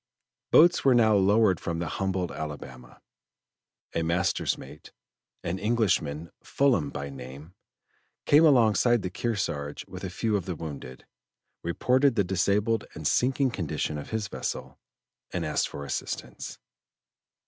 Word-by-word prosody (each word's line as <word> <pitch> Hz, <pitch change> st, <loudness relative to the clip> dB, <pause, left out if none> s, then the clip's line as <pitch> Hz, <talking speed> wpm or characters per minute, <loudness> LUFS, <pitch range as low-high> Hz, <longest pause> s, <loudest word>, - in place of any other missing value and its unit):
Boats 175 Hz, +2 st, +6 dB
were 135 Hz, -2 st, +5 dB
now 110 Hz, -2 st, +5 dB
lowered 100 Hz, -1 st, +4 dB
from 85 Hz, -1 st, -3 dB
the 85 Hz, -, -2 dB
humbled 95 Hz, -2 st, -2 dB
Alabama. 65 Hz, -5 st, -8 dB, 0.9 s
A 85 Hz, -, 0 dB
master's 85 Hz, +2 st, 0 dB
mate, -, -, -12 dB, 0.5 s
an 90 Hz, +2 st, -2 dB
Englishman, 90 Hz, -9 st, 0 dB
Fullam 120 Hz, -, +2 dB
by 70 Hz, 0 st, -5 dB
name, 70 Hz, +5 st, -10 dB, 0.7 s
came 150 Hz, +3 st, +6 dB
alongside 120 Hz, -5 st, +4 dB
the 90 Hz, -, -3 dB
Kearsarge 90 Hz, -10 st, -3 dB
with -, -, -9 dB
a 95 Hz, -, -3 dB
few 105 Hz, +4 st, -1 dB
of 95 Hz, -4 st, -1 dB
the 90 Hz, -, -3 dB
wounded, 70 Hz, -5 st, -8 dB, 0.6 s
reported 125 Hz, +9 st, +2 dB
the 100 Hz, -, +3 dB
disabled 100 Hz, +4 st, +1 dB
and 80 Hz, -, -8 dB
sinking 130 Hz, -, +2 dB
condition 80 Hz, -6 st, -3 dB
of -, -, -8 dB
his 110 Hz, -3 st, -2 dB
vessel, -, -, -5 dB, 0.5 s
and 85 Hz, -2 st, -2 dB
asked 75 Hz, -, 0 dB
for 70 Hz, -, -7 dB
assistance. -, -, -5 dB
95 Hz, 135 wpm, -27 LUFS, 80-115 Hz, 0.9 s, Boats